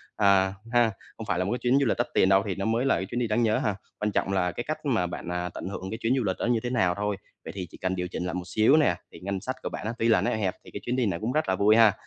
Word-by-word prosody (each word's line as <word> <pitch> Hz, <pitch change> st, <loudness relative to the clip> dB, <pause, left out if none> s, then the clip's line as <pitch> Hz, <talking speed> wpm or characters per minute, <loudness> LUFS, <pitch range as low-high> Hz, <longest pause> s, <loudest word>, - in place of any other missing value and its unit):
à 95 Hz, -1 st, +4 dB, 0.2 s
ha, 120 Hz, -2 st, +4 dB, 0.3 s
không 110 Hz, -, -6 dB
phải 90 Hz, -2 st, 0 dB
là 90 Hz, -, +1 dB
một 100 Hz, -, -2 dB
cái 125 Hz, -, -1 dB
chuyến 125 Hz, +2 st, +3 dB
du 140 Hz, -, +2 dB
lịch 110 Hz, -, +1 dB
đắt -, -, 0 dB
tiền 95 Hz, -, +4 dB
đâu 95 Hz, 0 st, +5 dB
thì 95 Hz, -, -2 dB
nó 95 Hz, -, -3 dB
mới 115 Hz, +4 st, +1 dB
là 135 Hz, -, +3 dB
cái 95 Hz, -, -2 dB
chuyến 120 Hz, -, -3 dB
đi 120 Hz, -, 0 dB
đáng 110 Hz, +2 st, +1 dB
nhớ 110 Hz, -1 st, +3 dB
ha. 105 Hz, -2 st, 0 dB, 0.2 s
Quan 105 Hz, 0 st, 0 dB
trọng 95 Hz, -, 0 dB
là 90 Hz, -2 st, +1 dB
cái 120 Hz, -, -4 dB
cách 155 Hz, 0 st, -5 dB
mà 110 Hz, -10 st, +1 dB
bạn, 90 Hz, 0 st, -6 dB
à, 90 Hz, 0 st, -2 dB
tận -, -, -6 dB
hưởng 95 Hz, -1 st, -5 dB
cái 110 Hz, -, -3 dB
chuyến 115 Hz, +3 st, +2 dB
du 125 Hz, -, +1 dB
lịch 95 Hz, -2 st, 0 dB
đó -, -, -1 dB
như 120 Hz, -1 st, +2 dB
thế 120 Hz, -, -2 dB
nào 95 Hz, -8 st, +2 dB
thôi. 105 Hz, -1 st, -2 dB, 0.3 s
Vậy -, -, -5 dB
thì 90 Hz, -3 st, -4 dB
chỉ -, -, -13 dB
cần 95 Hz, 0 st, -1 dB
điều 90 Hz, 0 st, -2 dB
chỉnh 90 Hz, 0 st, -4 dB
lại 90 Hz, -, -3 dB
một 90 Hz, 0 st, -3 dB
xíu 110 Hz, +8 st, +4 dB
nè, 145 Hz, -, +3 dB, 0.2 s
thì -, -, -12 dB
ngân 95 Hz, 0 st, -3 dB
sách 130 Hz, +3 st, -3 dB
của -, -, -2 dB
bạn -, -, -5 dB
tuy 115 Hz, -, +2 dB
là 115 Hz, -, +4 dB
nó -, -, +1 dB
eo 110 Hz, -, -1 dB
hẹp 95 Hz, -3 st, -1 dB
thì -, -, -14 dB
cái -, -, -6 dB
chuyến 125 Hz, -, -1 dB
đi 125 Hz, -, +1 dB
này 85 Hz, -5 st, -1 dB
cũng 115 Hz, +3 st, -2 dB
rất 155 Hz, +2 st, 0 dB
là 95 Hz, -, +2 dB
vui 105 Hz, +3 st, +4 dB
ha. 110 Hz, -3 st, +6 dB
105 Hz, 360 wpm, -27 LUFS, 95-120 Hz, 0.3 s, ha